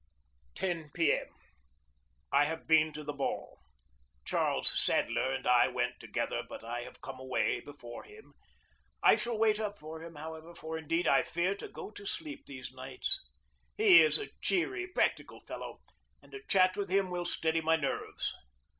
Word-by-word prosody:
10 170 -5 -2
P. 165 -3 +4
M. - - -2 1.0
I 145 +1 +5
have 160 +2 -4
been 155 -1 +5
to 150 0 -7
the 150 0 -4
ball. 140 -1 -3 0.7
Charles - - +3
Sadler 130 - +1
and 135 - -3
I 125 0 +6
went 125 -1 -2
together, - - -2
but - - -8
I 120 +1 -4
have - - -11
come 135 -1 -7
away 130 -1 0
before 120 -5 -10
him. 430 +1 -15 0.7
I - - +8
shall 235 -2 -2
wait 215 -1 +3
up 210 -2 -3
for 160 +1 -8
him, 165 0 -9
however, 160 +2 -8
for, 160 0 -6
indeed, 165 +2 0
I - - +5
fear 175 +3 0
to 200 - -8
go - - -8
to 200 -2 -9
sleep 305 +3 -5
these 130 -3 -7
nights. 130 - -2 0.6
He 410 -4 +9
is 465 - +5
a 420 - -6
cheery, 370 0 0
practical 360 - 0
fellow, - - -8 0.4
and - - -20
a 410 0 -8
chat 185 -2 +4
with 200 -3 -3
him 190 -1 +2
will 175 0 -2
steady 165 -1 +1
my 160 +1 +3
nerves. 150 -4 -2
160 Hz, 170 wpm, -32 LUFS, 145-205 Hz, 1.0 s, He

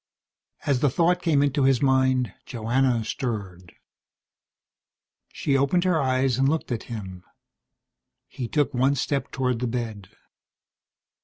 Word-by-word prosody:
As 140 -4 +2
the 145 - +3
thought 175 +6 +2
came 150 -5 +2
into 145 0 +1
his 135 -2 +4
mind, 130 -4 +2
Joanna 120 0 0
stirred. 95 -9 -5 1.6
She 140 - -1
opened 140 +6 +2
her 180 -4 +2
eyes 130 -1 +1
and 135 +1 +3
looked 160 -3 -2
at 115 - -3
him. 95 -6 -7 1.0
He 125 - -6
took 145 +2 0
one 130 +3 +2
step 140 +1 -2
toward 125 -3 -1
the 125 - -1
bed. 115 -5 -4
130 Hz, 130 wpm, -25 LUFS, 115-140 Hz, 1.6 s, his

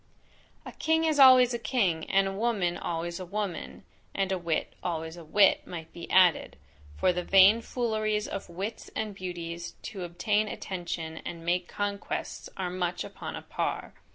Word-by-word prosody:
A - - -7
king 320 0 +1
is 310 -2 +1
always 255 -2 +8
a 235 - -2
king, 190 -11 0
and 195 0 +3
a 195 - -3
woman 200 -5 0
always 170 +1 -3
a - - -5
woman: 200 0 -4 0.3
(And 195 -1 0
a 190 - +1
wit, 170 -2 -2
always 160 -2 -3
a 170 - -10
wit, 195 +5 +4
might 165 -2 -8
be 170 - -9
added; 185 -3 +4 0.4
for 180 - +3
the 180 - -1
vain 195 +5 +6
fooleries 215 -3 -1
of 195 - -6
wits 195 +6 -5
and 215 -1 -2
beauties 170 -3 -6
to 195 -4 -6
obtain 205 +5 0
attention, 170 -5 -5
and 165 -1 -7
make 175 +1 0
conquests, 205 0 -4
are 185 -2 -2
much 180 -1 -2
upon - - -7
a - - -7
par.) - - -3
190 Hz, 170 wpm, -28 LUFS, 175-215 Hz, 0.4 s, always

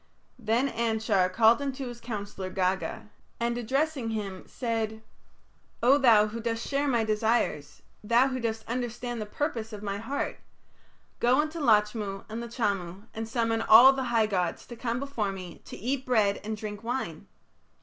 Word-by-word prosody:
Then 235 +5 +1
Anshar 220 -6 +1
called 225 +5 +5
unto 270 -1 -3
his 240 -1 -8
counsellor, 205 -4 -5
Gaga, 185 - -2 0.3
and 235 0 0
addressing 265 +2 -1
him, 200 -4 -4
said: 225 -2 -3 0.8
"O 270 +4 +6
thou 225 -6 +6
who 230 +2 -5
dost 230 0 -2
share 280 +1 0
my 240 -4 +2
desires, 215 -9 0 0.2
thou 235 +5 +4
who 260 -1 -3
dost 225 -2 -3
understand 240 0 -3
the 210 - -4
purpose 230 -2 -3
of 210 -1 -8
my 200 -1 -3
heart, 265 +6 -3 0.8
go 245 +3 +4
unto 310 +2 -1
Lachmu 210 -5 +1
and 225 +2 -4
Lachamu 200 -6 -2
and 225 0 -5
summon 225 -1 0
all 240 +5 +9
the 265 -1 -2
high 230 -2 +2
gods 180 -5 -1
to 240 - -9
come 235 0 -2
before 255 -8 -2
me 185 -2 -8
to - - -9
eat 255 +5 -2
bread 215 -6 +2
and 215 +1 -4
drink 210 -1 -6
wine. 230 -10 -4
225 Hz, 160 wpm, -28 LUFS, 210-245 Hz, 0.8 s, all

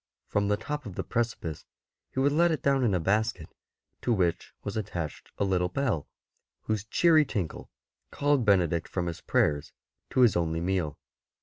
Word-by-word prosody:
From 100 0 0
the 105 0 +2
top 150 +3 -5
of 95 - -8
the - - -2
precipice 110 -9 -2 0.5
he - - -4
would 140 +2 +3
let 170 +4 +4
it 155 - -2
down 135 -1 +3
in 105 -6 +3
a - - +2
basket, 100 -1 0 0.5
to 125 - 0
which 90 -6 +1
was 100 - -4
attached 90 -8 -4
a - - +1
little 90 -2 +1
bell, 105 - -1 0.6
whose 110 -2 -1
cheery 160 +6 +5
tinkle 100 - -4 0.4
called 145 -3 +2
Benedict 90 -6 +2
from 90 -2 -2
his 85 -2 -4
prayers 75 -1 +1 0.4
to 130 - +2
his 120 -6 +6
only 80 -1 0
meal. 85 -4 -1
100 Hz, 175 wpm, -28 LUFS, 85-125 Hz, 0.6 s, his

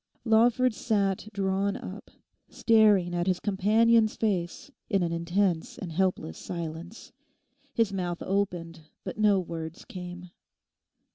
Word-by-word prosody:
Lawford 235 +2 +4
sat 205 -3 0
drawn 195 0 0
up, 195 +3 -9 0.4
staring 210 -6 +4
at 175 +1 -1
his 185 -1 +1
companion's 215 +3 +3
face 190 +3 -2 0.2
in 195 -5 +2
an 170 - -1
intense 170 +1 0
and 175 - -6
helpless 180 - -1
silence. 170 +4 -7 0.6
His 225 -4 +2
mouth 175 -2 -3
opened 180 -4 -2 0.2
but - - -6
no 205 -2 +4
words 165 -2 -6
came. 180 -1 -8
190 Hz, 120 wpm, -28 LUFS, 175-210 Hz, 0.6 s, Lawford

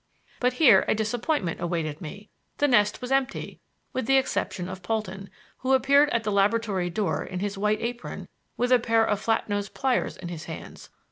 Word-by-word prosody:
But 250 0 +2
here 250 -9 +6
a - - +2
disappointment 220 - -1
awaited 165 -3 -2
me. 200 +6 -9 0.3
The 290 - +3
nest 210 -6 +3
was 250 - -5
empty 270 -1 -1 0.3
with 255 -3 -2
the 270 - +5
exception 200 -8 -1
of 190 0 -7
Polton, 195 -1 -3 0.3
who 260 +1 +1
appeared 280 +2 +5
at 235 - 0
the 210 - -1
laboratory 200 -2 +1
door 200 +3 -1
in 185 - -5
his 200 +1 -2
white 210 +2 0
apron, 240 +1 -5 0.3
with 245 +1 0
a 250 - +6
pair 225 -1 +3
of 210 -2 0
flat 225 0 0
nosed 205 -1 -3
pliers 265 -2 0
in 175 - -7
his 170 -1 -7
hands. 160 - -9
215 Hz, 190 wpm, -26 LUFS, 190-250 Hz, 0.3 s, here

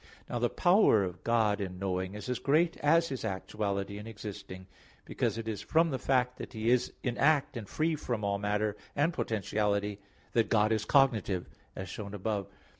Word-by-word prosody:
Now 120 - -2
the 120 0 +2
power 175 - +4
of 90 -1 -5
God 110 -3 +2
in 90 -2 -4
knowing 95 0 -2
is 105 - -7
as 125 -1 -1
great 155 +6 +2
as 165 +3 +3
His 135 -2 -4
actuality 100 0 -3
in 105 - -8
existing; 100 -3 -8 0.4
because - - -1
it 115 -1 -5
is 110 -3 -3
from 165 0 +2
the 130 - -2
fact 125 -1 +1
that - - -7
He 110 +1 +1
is 125 -1 +2
in 125 -2 -2
act 145 -2 +3
and 110 -4 -6
free 160 +1 0
from 120 -7 -3
all 100 0 0
matter 105 +1 0 0.2
and 150 +4 +2
potentiality, 105 - -1 0.3
that 115 -1 +2
God 110 -1 +3
is 110 -1 +1
cognitive, 115 -10 +2 0.3
as 95 - -5
shown 100 +2 -6
above 100 0 -2
(AA. - - -26
1, - - -27
2). - - -27
110 Hz, 200 wpm, -31 LUFS, 100-125 Hz, 0.4 s, power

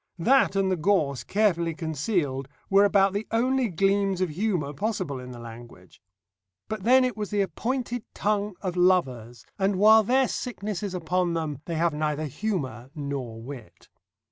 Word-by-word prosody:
That 245 +4 +3
and 195 -1 +2
the - - +2
gorse 160 -6 +1
carefully 170 -6 +1
concealed 155 - -2 0.2
were 200 +1 +6
about 195 -1 +3
the 205 +2 -3
only 255 +2 +1
gleams 195 +1 +1
of 185 -2 0
humour 170 -4 -1
possible 185 - -3
in 125 0 -9
the 125 - -9
language. 115 -5 -12 0.7
But 215 -1 -4
then 255 +5 +5
it 250 - -2
was 210 -2 -4
the 205 -1 +1
appointed 245 +4 -3
tongue 205 -1 -1
of 185 -2 -2
lovers, 130 -11 +1
and 195 +1 +2
while 215 +3 +7
their 255 +4 +2
sickness 215 -6 -4
is 200 -3 -4
upon 175 0 0
them 155 -4 -3
they 170 - -4
have 165 0 +1
neither 150 0 -1
humour 140 - -4
nor 140 -6 -5
wit. 125 -3 -11
185 Hz, 165 wpm, -26 LUFS, 145-210 Hz, 0.7 s, while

